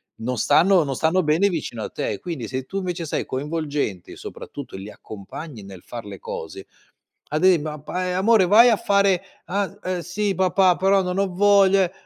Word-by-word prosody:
Non 125 +2 -4
stanno 170 - +4
non 135 -2 -3
stanno 165 +5 +1
bene 165 +7 +3
vicino 140 - -4
a - - -5
te. 100 - -4
Quindi 150 -11 -5
se 130 0 -4
tu, 195 +9 -6
invece, 180 -3 -3
sei - - -2
coinvolgente, 145 - -3
soprattutto 140 -8 -9
li 100 +2 -8
accompagni 110 +4 -10
nel 95 -2 -11
far 115 -3 -8
le 100 -2 -9
cose, 80 +4 -7 0.6
ad 155 +4 -1
e 185 -4 +6
ma 150 0 -5
pa 180 +4 -3
"Amore, 200 -2 +4
vai 230 +5 +7
a 220 - +3
fare?" 200 -2 +2 0.2
"Ah, 200 +1 -2
ehm, 185 -1 -2
sì, 195 +4 -2
papà, 185 -1 +3
però 195 +1 +3
non 180 +1 -3
ho 200 - +2
voglia, 195 0 +5
eh" 180 - -2
175 Hz, 190 wpm, -22 LUFS, 135-195 Hz, 0.6 s, vai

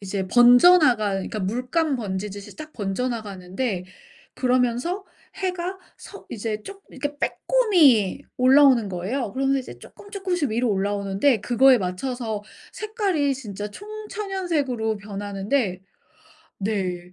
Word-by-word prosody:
이제 195 -1 -3
번져나갈 245 - +6
그니까 215 +3 -5
물감 250 - -1
번지듯이 200 -2 -5
쫙 310 0 -9
번져나가는데 200 -2 -3 0.5
그러면서 255 - 0 0.3
해가 370 -1 -3 0.2
서 400 - -12
이제 215 -1 -4
쪽 395 0 -11
이렇게 290 +2 -5
빼꼼히 300 - +3
올라오는 260 -3 +5
거예요. 195 +6 -3
그러면서 270 +1 +1
이제 255 - -11
쪼끔쪼끔씩 375 - -4
위로 235 +1 +1
올라오는데 200 +4 +1
그거에 250 +2 +5
맞춰서 215 +3 -3 0.3
색깔이 390 - -1
진짜 210 -5 -6
총천연색으로 370 - -3
변하는데 200 +1 -2 0.8
네. 185 -4 -3
245 Hz, 300 characters per minute, -23 LUFS, 205-300 Hz, 0.8 s, 번져나갈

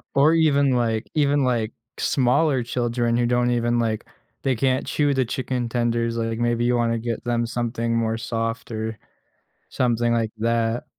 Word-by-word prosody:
Or 145 +4 +5
even 145 -4 +3
like 115 -2 0
even 145 -2 +2
like 115 -3 0 0.3
smaller 130 +1 +2
children 120 0 -1
who 120 0 +2
don't 120 0 +2
even 120 0 +1
like 110 -2 -1 0.4
they 135 -1 +1
can't 130 +2 +1
chew 145 -1 +1
the 130 -1 +2
chicken 125 0 -3
tenders, 115 -1 0
like, 115 0 -2
maybe 120 0 +1
you 125 0 +2
wanna 115 -1 +1
get 115 0 -4
them 120 -1 0
something 115 0 -2
more 115 -1 0
soft 115 0 -3
or 110 0 -4 0.7
something 120 -1 +1
like 115 -2 0
that. 115 +1 0
120 Hz, 165 wpm, -23 LUFS, 115-125 Hz, 0.7 s, Or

